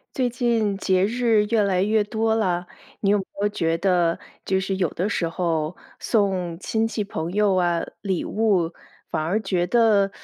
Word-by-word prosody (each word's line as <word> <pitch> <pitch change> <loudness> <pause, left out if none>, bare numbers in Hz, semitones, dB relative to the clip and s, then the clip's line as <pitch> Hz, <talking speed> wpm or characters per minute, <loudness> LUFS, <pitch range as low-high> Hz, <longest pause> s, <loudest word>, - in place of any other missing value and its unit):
最 255 -2 +1
近 230 -4 0
节 190 -1 +2
日 225 -1 +2
越 220 0 +2
来 190 -2 +2
越 215 +1 +2
多 220 +1 0
了， 180 -5 0 0.4
你 200 -1 +2
有 205 - +3
没 - - -3 0.2
有 205 - +2
觉 165 -5 0
得 175 -2 +1 0.3
就 190 0 +1
是 190 0 -2
有 180 -5 +1
的 185 - -2
时 175 -5 -1
候 165 -1 -1 0.2
送 190 -6 0
亲 220 +3 0
戚 225 -1 -2
朋 170 -4 -4
友 205 -1 +3
啊 175 -2 +1 0.2
礼 190 -4 -2
物， 200 -7 +1 0.4
反 - - -1
而 180 +7 0
觉 180 -3 0
得， 210 -2 +3
195 Hz, 195 characters per minute, -23 LUFS, 175-215 Hz, 0.4 s, 有